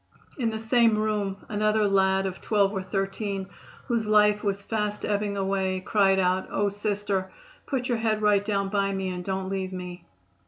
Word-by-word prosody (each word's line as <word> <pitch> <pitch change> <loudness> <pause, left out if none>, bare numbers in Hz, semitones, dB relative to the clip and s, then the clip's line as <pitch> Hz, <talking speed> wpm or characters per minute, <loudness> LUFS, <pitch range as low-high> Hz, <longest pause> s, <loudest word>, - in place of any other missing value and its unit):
In 235 -3 +1
the 220 - -3
same 225 -1 +3
room 210 -2 -2
another 215 0 +2
lad 190 -1 +2
of 190 -1 -4
twelve 205 -2 +2
or 190 - -2
thirteen, 195 0 -3 0.4
whose 235 -4 -1
life 210 0 +4
was 200 -1 0
fast 210 -1 -2
ebbing 205 -1 -1
away, 190 -1 0
cried 195 0 +3
out: 185 0 +1
"Oh, 205 0 +1
Sister, 200 -2 -2 0.4
put 255 -3 -1
your 240 -2 0
head 220 -1 +1
right 205 -1 +4
down 200 -2 -1
by 200 -1 +1
me 190 -1 -2
and 180 -1 -4
don't 190 0 -3
leave 190 -1 -3
me." 180 -1 -7
200 Hz, 180 wpm, -26 LUFS, 190-215 Hz, 0.4 s, life